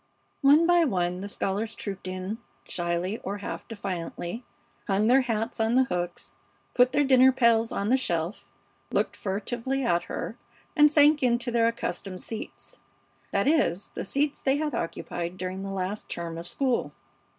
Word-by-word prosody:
One 290 Hz, +4 st, +6 dB
by 350 Hz, 0 st, +5 dB
one 180 Hz, -, 0 dB
the 200 Hz, -, -5 dB
scholars 205 Hz, +3 st, -2 dB
trooped 195 Hz, -2 st, -5 dB
in, 185 Hz, +4 st, -4 dB, 0.2 s
shyly 175 Hz, +4 st, -2 dB
or 200 Hz, +2 st, -4 dB
half 200 Hz, -, -6 dB
defiantly, 195 Hz, 0 st, -5 dB, 0.4 s
hung 200 Hz, +1 st, +2 dB
their 255 Hz, +4 st, +5 dB
hats 225 Hz, -2 st, -2 dB
on 225 Hz, +2 st, +2 dB
the 260 Hz, -, +6 dB
hooks, 175 Hz, -7 st, -4 dB, 0.4 s
put 250 Hz, 0 st, +4 dB
their 290 Hz, +2 st, +3 dB
dinner 260 Hz, -1 st, +6 dB
pails 230 Hz, -3 st, +3 dB
on 200 Hz, +1 st, -1 dB
the 260 Hz, -, +5 dB
shelf, 175 Hz, -6 st, -2 dB, 0.4 s
looked -, -, 0 dB
furtively 235 Hz, +7 st, -2 dB
at 175 Hz, -6 st, +1 dB
her, -, -, -5 dB, 0.4 s
and 300 Hz, -1 st, +6 dB
sank 300 Hz, 0 st, +5 dB
into 240 Hz, -1 st, +1 dB
their 230 Hz, -1 st, +3 dB
accustomed 195 Hz, -5 st, -3 dB
seats; 225 Hz, -, -7 dB, 0.5 s
that -, -, +1 dB
is, 275 Hz, -, +2 dB
the -, -, -5 dB
seats 285 Hz, +7 st, -1 dB
they 270 Hz, +1 st, +2 dB
had 300 Hz, 0 st, -2 dB
occupied 170 Hz, +1 st, -4 dB
during 185 Hz, +1 st, -4 dB
the 195 Hz, -, -5 dB
last 195 Hz, +2 st, -4 dB
term 170 Hz, -1 st, -4 dB
of 170 Hz, -, -7 dB
school. 260 Hz, +2 st, 0 dB
220 Hz, 160 wpm, -27 LUFS, 185-260 Hz, 0.5 s, One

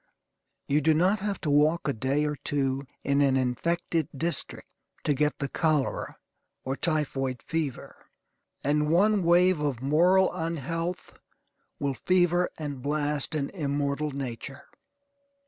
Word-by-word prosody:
You 145 Hz, +2 st, +2 dB
do 155 Hz, +2 st, +3 dB
not 185 Hz, +6 st, +3 dB
have 200 Hz, 0 st, -3 dB
to 150 Hz, -, -1 dB
walk 150 Hz, +4 st, +3 dB
a 140 Hz, -, +1 dB
day 135 Hz, +6 st, 0 dB
or 150 Hz, 0 st, -1 dB
two 135 Hz, -1 st, -2 dB, 0.2 s
in 140 Hz, 0 st, +2 dB
an 135 Hz, -2 st, +3 dB
infected 160 Hz, +5 st, -1 dB
district 170 Hz, +4 st, -2 dB, 0.4 s
to 145 Hz, -, +2 dB
get 150 Hz, +2 st, 0 dB
the 140 Hz, -, -2 dB
cholera 155 Hz, -2 st, -1 dB, 0.5 s
or 135 Hz, +1 st, -2 dB
typhoid 135 Hz, -6 st, -1 dB
fever; 160 Hz, -5 st, -4 dB, 0.6 s
and 150 Hz, +1 st, +1 dB
one 200 Hz, +5 st, +4 dB
wave 175 Hz, 0 st, +4 dB
of 145 Hz, -5 st, -1 dB
moral 180 Hz, +7 st, +4 dB
unhealth 165 Hz, +1 st, -4 dB, 0.6 s
will 140 Hz, -1 st, -1 dB
fever 175 Hz, +3 st, +2 dB
and 145 Hz, -4 st, -5 dB
blast 145 Hz, +1 st, -1 dB
an 140 Hz, -2 st, -2 dB
immortal 145 Hz, -2 st, -1 dB
nature. 135 Hz, 0 st, -6 dB
150 Hz, 130 wpm, -27 LUFS, 140-170 Hz, 0.6 s, one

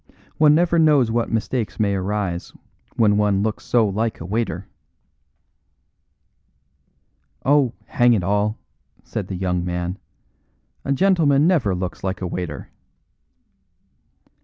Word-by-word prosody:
One 150 Hz, -1 st, +6 dB
never 170 Hz, 0 st, +2 dB
knows 145 Hz, -7 st, +4 dB
what 115 Hz, 0 st, -1 dB
mistakes 115 Hz, +1 st, -2 dB
may 100 Hz, -2 st, +2 dB
arise 95 Hz, -2 st, -3 dB, 0.4 s
when 105 Hz, -2 st, +3 dB
one 100 Hz, -1 st, +2 dB
looks 110 Hz, -1 st, -2 dB
so 115 Hz, -3 st, +3 dB
like 110 Hz, +3 st, -2 dB
a 80 Hz, -, -7 dB
waiter." 100 Hz, -2 st, -2 dB, 2.8 s
"Oh, 135 Hz, -3 st, +3 dB
hang 120 Hz, -3 st, +3 dB
it 100 Hz, -5 st, +1 dB
all!" 105 Hz, +3 st, 0 dB, 0.5 s
said 100 Hz, -4 st, -5 dB
the 95 Hz, -, -5 dB
young 90 Hz, -1 st, -1 dB
man, 90 Hz, +1 st, -3 dB, 0.8 s
"a -, -, -2 dB
gentleman 150 Hz, -3 st, +3 dB
never 145 Hz, -, +2 dB
looks 90 Hz, 0 st, -5 dB
like 95 Hz, 0 st, -2 dB
a 95 Hz, -, -4 dB
waiter." 90 Hz, -4 st, -5 dB
105 Hz, 120 wpm, -21 LUFS, 95-130 Hz, 2.8 s, One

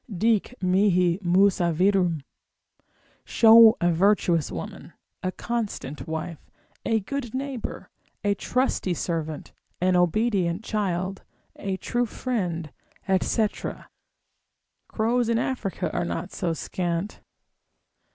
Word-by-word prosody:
Dic 220 Hz, +4 st, +1 dB
mihi 180 Hz, -1 st, +3 dB
Musa 180 Hz, -1 st, +3 dB
virum—show 195 Hz, -, +2 dB
a 175 Hz, 0 st, +2 dB
virtuous 175 Hz, -, +2 dB
woman, 80 Hz, -4 st, -7 dB, 0.3 s
a 185 Hz, -, -1 dB
constant 210 Hz, -, -4 dB
wife, 160 Hz, 0 st, -4 dB, 0.4 s
a 225 Hz, -1 st, +1 dB
good 255 Hz, +2 st, -5 dB
neighbour, 270 Hz, -2 st, -5 dB, 0.4 s
a 205 Hz, 0 st, +2 dB
trusty 220 Hz, -5 st, -1 dB
servant, 160 Hz, -3 st, -4 dB, 0.3 s
an 185 Hz, +1 st, +2 dB
obedient 180 Hz, 0 st, +1 dB
child, 195 Hz, -3 st, -2 dB, 0.3 s
a 195 Hz, -1 st, -3 dB
true 240 Hz, +4 st, -1 dB
friend, 180 Hz, -, -3 dB, 0.5 s
&c. 220 Hz, -2 st, +2 dB, 1.4 s
Crows 235 Hz, +2 st, 0 dB
in 230 Hz, -, +2 dB
Africa 235 Hz, -5 st, -2 dB
are -, -, 0 dB
not 175 Hz, +2 st, -4 dB
so 170 Hz, -3 st, -2 dB
scant. 175 Hz, +4 st, -3 dB
190 Hz, 100 wpm, -25 LUFS, 175-225 Hz, 1.4 s, mihi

